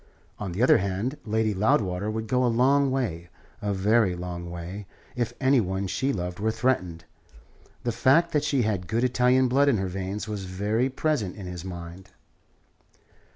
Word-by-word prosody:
On 100 Hz, -3 st, -4 dB
the 100 Hz, +8 st, -1 dB
other 125 Hz, -, +6 dB
hand, 100 Hz, +8 st, -2 dB
Lady 110 Hz, 0 st, +1 dB
Loudwater 100 Hz, -3 st, +1 dB
would 110 Hz, +1 st, -3 dB
go 125 Hz, +3 st, +1 dB
a -, -, +3 dB
long 135 Hz, +4 st, +3 dB
way 100 Hz, -11 st, -2 dB, 0.3 s
a 105 Hz, -, -1 dB
very 100 Hz, 0 st, +2 dB
long 85 Hz, -1 st, -6 dB
way 90 Hz, +4 st, -7 dB, 0.3 s
if 120 Hz, -2 st, -1 dB
any 130 Hz, -1 st, +4 dB
one 95 Hz, 0 st, -2 dB
she 130 Hz, +8 st, -1 dB
loved 90 Hz, -3 st, -4 dB
were 110 Hz, +2 st, +1 dB
threatened. 90 Hz, -8 st, -1 dB, 0.8 s
The 120 Hz, -, 0 dB
fact 150 Hz, +9 st, +3 dB
that 150 Hz, -, +1 dB
she 135 Hz, -4 st, +1 dB
had 100 Hz, -5 st, -1 dB
good 115 Hz, +7 st, 0 dB
Italian 125 Hz, +1 st, +3 dB
blood 140 Hz, +3 st, +3 dB
in 125 Hz, -, +3 dB
her 95 Hz, -1 st, -1 dB
veins 95 Hz, +3 st, -4 dB
was 105 Hz, -3 st, -4 dB
very 105 Hz, +7 st, 0 dB
present 130 Hz, -, -1 dB
in 100 Hz, -, -8 dB
his 90 Hz, -1 st, -6 dB
mind. 90 Hz, +1 st, -8 dB
105 Hz, 175 wpm, -26 LUFS, 95-125 Hz, 0.8 s, other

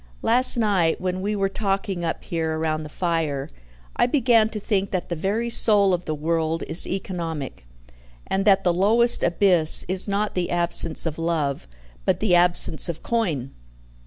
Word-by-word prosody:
Last 245 Hz, +2 st, +5 dB
night, 195 Hz, -8 st, +1 dB
when 185 Hz, 0 st, -3 dB
we 210 Hz, +2 st, -2 dB
were 195 Hz, -1 st, 0 dB
talking 195 Hz, -2 st, -3 dB
up 165 Hz, -, -3 dB
here 160 Hz, -2 st, -3 dB
round 155 Hz, -1 st, -2 dB
the 150 Hz, -, -9 dB
fire, 160 Hz, -5 st, -3 dB, 0.4 s
I -, -, +2 dB
began 235 Hz, -5 st, +2 dB
to 220 Hz, -, -5 dB
think 200 Hz, -2 st, -1 dB
that 185 Hz, -2 st, -4 dB
the 170 Hz, -, -3 dB
very 215 Hz, +8 st, -2 dB
soul 205 Hz, -4 st, +4 dB
of 180 Hz, 0 st, -3 dB
the 155 Hz, -, -3 dB
world 160 Hz, +1 st, -2 dB
is 165 Hz, -, 0 dB
economic, 165 Hz, -, -6 dB, 0.6 s
and 195 Hz, -, -1 dB
that 195 Hz, -2 st, +4 dB
the 175 Hz, -, +2 dB
lowest 225 Hz, +7 st, +2 dB
abyss 170 Hz, -2 st, +3 dB
is 185 Hz, +2 st, -1 dB
not 205 Hz, +1 st, -2 dB
the 180 Hz, -1 st, -2 dB
absence 170 Hz, -2 st, +1 dB
of 165 Hz, -1 st, -4 dB
love, 155 Hz, -, -2 dB, 0.4 s
but -, -, 0 dB
the 210 Hz, -4 st, 0 dB
absence 175 Hz, -1 st, +3 dB
of 165 Hz, -, -6 dB
coin." 165 Hz, -, -2 dB
180 Hz, 170 wpm, -22 LUFS, 165-200 Hz, 0.6 s, Last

